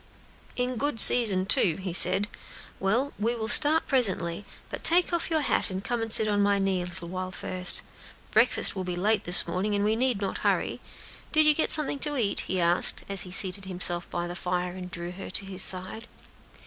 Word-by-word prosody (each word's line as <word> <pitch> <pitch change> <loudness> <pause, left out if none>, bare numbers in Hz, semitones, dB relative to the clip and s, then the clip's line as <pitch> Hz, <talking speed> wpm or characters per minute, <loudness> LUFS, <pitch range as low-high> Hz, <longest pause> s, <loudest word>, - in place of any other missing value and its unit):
"In 250 0 -4
good 285 -1 -4
season, 210 -7 +8
too," 175 -3 0
he 185 -1 -8
said. 190 +3 +4 0.5
"Well, 235 +9 -2
we 230 +3 -2
will 220 -2 -6
start 310 +6 +5
presently; 195 - -1 0.3
but - - -8
take 350 +1 +4
off 340 - -3
your 320 -2 -1
hat - - -1
and 190 0 -7
come 240 +1 -4
and 225 -1 -6
sit 220 0 +6
on 205 -1 -1
my 200 0 0
knee 195 -2 -2
a - - -6
little 175 -1 -9
while 185 0 -7
first; 180 0 -1 0.5
breakfast - - +1
will 190 - -5
be 180 -1 -6
late 210 +3 -2
this 175 +1 +3
morning, 205 +3 -4
and 200 0 -2
we 215 +1 0
need 250 -2 -2
not 195 -2 -5
hurry. - - -3 0.5
Did 310 0 +2
you 305 - +4
get 310 - -2
something 295 -2 +1
to 295 0 0
eat?" 210 -5 -2
he 185 - -4
asked, 170 +1 +1
as 195 -2 -2
he 180 - -6
seated 190 +1 +3
himself 180 -2 0
by 175 0 -5
the 175 - -9
fire 180 0 -5
and 180 0 -10
drew 175 -1 -9
her 190 +2 -11
to 195 - -3
his 190 -1 -7
side. 190 +6 -1
195 Hz, 210 wpm, -24 LUFS, 180-235 Hz, 0.5 s, season